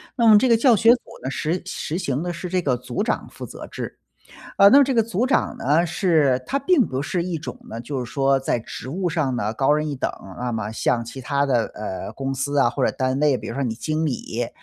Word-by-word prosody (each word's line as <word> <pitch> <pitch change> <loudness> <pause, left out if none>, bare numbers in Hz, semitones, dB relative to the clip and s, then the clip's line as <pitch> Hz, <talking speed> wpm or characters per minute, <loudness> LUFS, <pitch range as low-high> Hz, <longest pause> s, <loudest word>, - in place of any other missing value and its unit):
那 235 -3 +3
么 215 -1 +9
这 255 +3 +3
个 230 - +5
教 240 0 +5
学 225 +2 +4
组 245 - +3 0.2
呢， 130 - -2
实 165 +6 -2
实 170 -3 -4
行 140 -6 -2
的 175 0 -3
是 175 +1 -6
这 185 0 0
个 135 -6 +1
组 125 +4 -4
长 - - -2
负 - - -8
责 - - -9
制。 - - -7 0.6
呃， 200 - +9
那 270 - +7
么 285 - +7
这 270 - 0
个 230 - +4
组 220 +1 -1
长 260 - +1
呢， 155 +6 +2
是 160 -7 +2
他 275 - 0
并 280 -2 +3
不 130 0 -3
是 170 +4 -1
一 175 -2 -3
种 160 - -7
呢 115 - -5
就 130 +1 -4
是 120 - -10
说 135 -1 +2
在 130 -2 -1
职 115 +1 -8
务 180 +5 -2
上 150 -6 -1
呢， 110 -2 -2
高 135 +4 +2
人 150 +1 0
一 145 - -3
等， 130 - -2 0.3
那 125 0 -2
么 110 -2 -3
像 115 +1 0
其 115 +3 -8
它 140 +3 0
的， 120 -4 +2
呃， 105 -3 -5
公 135 0 -3
司 140 +2 -1
啊 135 - +5
或 120 - -1
者 - - +2
单 130 0 -1
位 145 -4 +3
比 - - -8
如 - - -5
说 140 - -2
你 120 -4 -1
经 155 +6 -2
理， 120 -4 -3
145 Hz, 280 characters per minute, -22 LUFS, 130-180 Hz, 0.6 s, 么